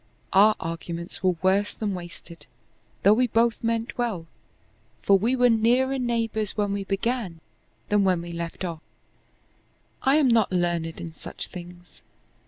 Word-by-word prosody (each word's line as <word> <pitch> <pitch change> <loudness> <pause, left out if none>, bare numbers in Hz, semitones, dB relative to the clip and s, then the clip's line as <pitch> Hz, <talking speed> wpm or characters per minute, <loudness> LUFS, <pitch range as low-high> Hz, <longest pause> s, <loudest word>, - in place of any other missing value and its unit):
Our 210 +3 +6
arguments 170 +1 -5
were 185 -1 +2
worse 195 +2 +2
than 210 -3 -2
wasted, 170 -3 -10 0.6
though 200 - +7
we 250 +3 +2
both 230 +1 +1
meant 230 +1 -2
well, 215 -9 -1 0.8
for 200 - +5
we 225 +7 +2
were 250 -1 +4
nearer 245 +4 +2
neighbors 225 -4 -1
when 205 -1 0
we 200 0 -2
began 195 -3 -2 0.5
than 210 -1 +3
when 180 -3 +1
we 175 - -7
left 170 +2 -5
off. 165 -3 -5 1.2
I 270 +2 +3
am 300 -3 +4
not 230 -5 +3
learned 175 -2 -1
in 165 -1 -7
such - - -4
things. 175 0 -12
200 Hz, 150 wpm, -25 LUFS, 175-230 Hz, 1.2 s, though